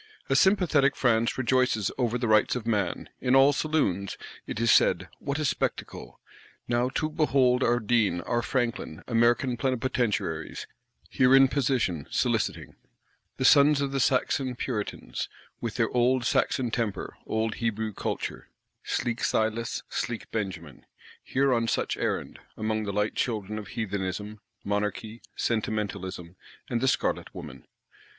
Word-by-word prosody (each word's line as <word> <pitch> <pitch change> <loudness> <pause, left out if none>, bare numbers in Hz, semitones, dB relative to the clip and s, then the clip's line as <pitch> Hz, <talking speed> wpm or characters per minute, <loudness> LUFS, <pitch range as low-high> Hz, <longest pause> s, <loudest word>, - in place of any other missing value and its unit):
A - - +4
sympathetic 170 -8 +4
France 115 -2 +2
rejoices 125 -5 +1
over 125 -2 0
the 120 -1 -2
Rights 110 +2 +4
of 120 -3 -4
Man; 105 -5 -1
in 125 +1 +2
all 135 +2 +6
saloons, 140 - 0 0.3
it - - -4
is 115 -1 +3
said, - - +4
What 140 +1 -3
a 155 - -1
spectacle! - - -3 0.5
Now 120 +1 +1
too 155 +3 -1
behold 135 -5 +3
our 120 +1 +3
Deane, 110 -6 +1
our 120 +7 -1
Franklin, 120 - -2
American 120 +2 +2
Plenipotentiaries, 115 - -1 0.4
here 130 +1 +4
in 135 0 +7
position 125 - 0
soliciting; - - -1 0.6
the 130 - 0
sons 145 +1 +6
of 140 -1 -1
the 135 - -1
Saxon 130 0 +1
Puritans, 105 - -4 0.3
with 115 -2 -4
their 115 -2 +1
Old 125 0 +2
Saxon 125 -2 +1
temper, 110 -4 -2
Old 110 0 0
Hebrew 110 -1 -1
culture, - - -4 0.3
sleek 120 -1 -2
Silas, 110 +1 0
sleek 120 -2 -4
Benjamin, 90 - -5 0.4
here 135 0 +1
on 115 -1 +1
such - - 0
errand, - - -3 0.2
among 110 0 -1
the 100 - -2
light 105 +1 0
children 105 -3 -2
of 105 - -9
Heathenism, 105 0 -4 0.2
Monarchy, 105 +2 -3
Sentimentalism, 100 -5 -3 0.3
and 120 -1 0
the 130 - +2
Scarlet 135 - 0
woman. - - -9
115 Hz, 140 wpm, -27 LUFS, 105-130 Hz, 0.6 s, in